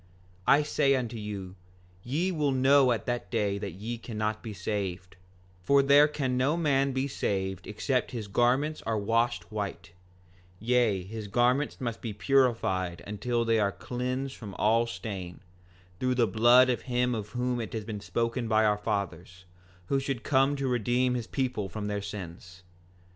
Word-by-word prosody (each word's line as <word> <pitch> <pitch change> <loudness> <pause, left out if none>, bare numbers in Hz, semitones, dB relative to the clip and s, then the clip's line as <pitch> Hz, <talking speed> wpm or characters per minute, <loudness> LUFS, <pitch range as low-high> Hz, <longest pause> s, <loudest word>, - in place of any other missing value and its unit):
5:21 - - +8
I 150 - +2
say 140 -2 +2
unto 120 -3 -3
you, 100 -3 -6 0.5
ye 155 - -1
will 150 -5 0
know 135 0 +5
at 115 - -1
that 120 -1 -3
day 105 -4 0
that 100 -4 -5
ye 115 +6 -5
cannot 110 -2 -3
be 115 - -6
saved; 95 -1 -4 0.5
for 140 +8 +4
there 140 +2 +6
can 135 -4 -2
no 135 +6 +1
man 140 -4 +2
be 130 +1 -1
saved 95 -8 -2
except 125 +4 -1
his 115 -4 -5
garments 125 +9 +1
are 110 -1 -1
washed 115 +3 0
white; 100 -6 -5 0.7
yea, 115 -4 +2
his 105 +2 -7
garments 125 +7 +1
must 120 -3 -4
be 115 -3 -4
purified 105 -7 +1
until 115 +4 -1
they 115 -1 +3
are 100 -1 +2
cleansed 130 +4 -4
from 100 -5 -9
all 115 +2 +2
stain, 95 -4 -6 0.6
through 130 0 +1
the 120 -2 +4
blood 120 +3 +5
of 120 - -2
him 125 0 +1
of 105 -2 -4
whom 125 -1 0
it 110 - -6
has 110 -2 -4
been 105 -2 -5
spoken 115 +3 -2
by 110 0 +3
our 105 -1 +2
fathers, 95 -4 -4 0.4
who 135 +8 +1
should 135 -3 -3
come 135 0 +3
to 140 -1 -2
redeem 125 +1 +1
his 120 -2 -3
people 125 -7 -2
from 105 +3 -5
their 105 0 -2
sins. 90 -2 -8
115 Hz, 170 wpm, -28 LUFS, 105-130 Hz, 0.7 s, 5:21